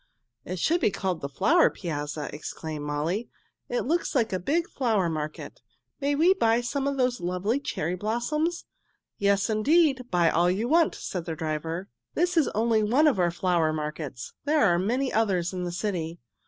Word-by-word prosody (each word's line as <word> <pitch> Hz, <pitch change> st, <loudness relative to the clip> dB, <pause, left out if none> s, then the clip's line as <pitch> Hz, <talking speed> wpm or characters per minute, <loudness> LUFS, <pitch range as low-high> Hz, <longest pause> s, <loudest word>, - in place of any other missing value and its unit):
"It 185 Hz, -, -4 dB
should 335 Hz, -, +1 dB
be -, -, +4 dB
called 190 Hz, -4 st, -2 dB
the 140 Hz, -, -4 dB
Flower 330 Hz, -, +4 dB
Piazza!" 150 Hz, -3 st, -4 dB
exclaimed 150 Hz, 0 st, -6 dB
May. 160 Hz, +10 st, -1 dB, 0.4 s
"It 245 Hz, -, 0 dB
looks 330 Hz, +3 st, 0 dB
like 230 Hz, -5 st, +1 dB
a 185 Hz, -, 0 dB
big 325 Hz, -, 0 dB
flower 220 Hz, -9 st, 0 dB
market. 155 Hz, -2 st, -5 dB, 0.4 s
May 285 Hz, +1 st, +1 dB
we 335 Hz, +6 st, +5 dB
buy 230 Hz, -9 st, +2 dB
some 275 Hz, +3 st, -2 dB
of 280 Hz, -1 st, -1 dB
those 250 Hz, -1 st, +1 dB
lovely 180 Hz, +8 st, 0 dB
cherry 175 Hz, -, -3 dB
blossoms?" 240 Hz, -, -1 dB, 0.5 s
"Yes, 200 Hz, 0 st, +2 dB
indeed! 260 Hz, +3 st, +2 dB
Buy 170 Hz, -2 st, +3 dB
all 175 Hz, +2 st, +3 dB
you 200 Hz, +6 st, 0 dB
want," 325 Hz, +4 st, +3 dB
said 180 Hz, -3 st, -5 dB
their 165 Hz, -1 st, -4 dB
driver. 160 Hz, +4 st, -3 dB, 0.3 s
"This 360 Hz, +2 st, +1 dB
is 320 Hz, -4 st, +4 dB
only 225 Hz, 0 st, +2 dB
one 245 Hz, +9 st, +3 dB
of 275 Hz, -10 st, +3 dB
our 175 Hz, -1 st, +3 dB
flower 170 Hz, -2 st, +1 dB
markets. 150 Hz, -4 st, -5 dB
There 295 Hz, -3 st, +3 dB
are 175 Hz, -3 st, +3 dB
many 250 Hz, +8 st, 0 dB
others 190 Hz, -5 st, +1 dB
in 180 Hz, -1 st, -3 dB
the 175 Hz, -, -3 dB
city." 175 Hz, -3 st, -3 dB
200 Hz, 180 wpm, -27 LUFS, 170-265 Hz, 0.5 s, we